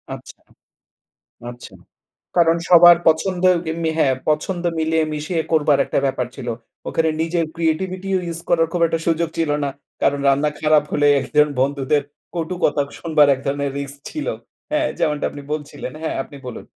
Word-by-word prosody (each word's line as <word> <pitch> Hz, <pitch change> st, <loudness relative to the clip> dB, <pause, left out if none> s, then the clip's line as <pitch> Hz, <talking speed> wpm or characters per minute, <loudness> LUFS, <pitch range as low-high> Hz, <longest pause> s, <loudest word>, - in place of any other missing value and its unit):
আচ্ছা। -, -, -14 dB, 1.1 s
আচ্ছা। 120 Hz, 0 st, -12 dB, 0.6 s
কারণ 165 Hz, -1 st, +4 dB
সবার 175 Hz, -1 st, +9 dB
পছন্দ 175 Hz, +3 st, +1 dB, 0.2 s
যেমনি 160 Hz, 0 st, -1 dB
হ্যাঁ, 135 Hz, -4 st, +3 dB
পছন্দ 170 Hz, +4 st, -1 dB
মিলিয়ে 160 Hz, 0 st, +1 dB
মিশিয়ে 155 Hz, +3 st, -2 dB
করবার 150 Hz, -2 st, +3 dB
একটা -, -, -1 dB
ব্যাপার 130 Hz, -2 st, -1 dB
ছিল। 120 Hz, -, -6 dB, 0.4 s
ওখানে 160 Hz, 0 st, +1 dB
নিজের 165 Hz, +1 st, 0 dB
ক্রিয়েটিভিটিও 185 Hz, +4 st, -1 dB
ইউস 170 Hz, -1 st, -4 dB
করার 165 Hz, -1 st, +3 dB
খুব 175 Hz, -, -1 dB
একটা 165 Hz, 0 st, -1 dB
সুযোগ 170 Hz, 0 st, +1 dB
ছিল 160 Hz, -2 st, +1 dB
না। 140 Hz, -, -1 dB, 0.3 s
কারণ 145 Hz, -, +2 dB
রান্না 140 Hz, +2 st, +2 dB
খারাপ 155 Hz, -1 st, +4 dB
হলে, 145 Hz, 0 st, +2 dB
একজন 150 Hz, +2 st, +3 dB
বন্ধুদের 140 Hz, +1 st, +1 dB, 0.3 s
কটু 170 Hz, +1 st, -3 dB
কথা 145 Hz, -1 st, +2 dB, 0.2 s
শুনবার 155 Hz, -3 st, +3 dB
এক 135 Hz, -, -9 dB
ধরনের 140 Hz, 0 st, -1 dB
রিস্ক 140 Hz, 0 st, -6 dB
ছিল। 305 Hz, -, -5 dB, 0.4 s
হ্যাঁ! 305 Hz, 0 st, +1 dB
যেমনটা 150 Hz, -1 st, 0 dB
আপনি 145 Hz, -, -9 dB
বলছিলেন, 150 Hz, -4 st, -5 dB
হ্যাঁ, 160 Hz, -, -2 dB
আপনি 140 Hz, -, -13 dB
বলুন। 125 Hz, -, -7 dB
160 Hz, 155 wpm, -20 LUFS, 145-170 Hz, 1.1 s, সবার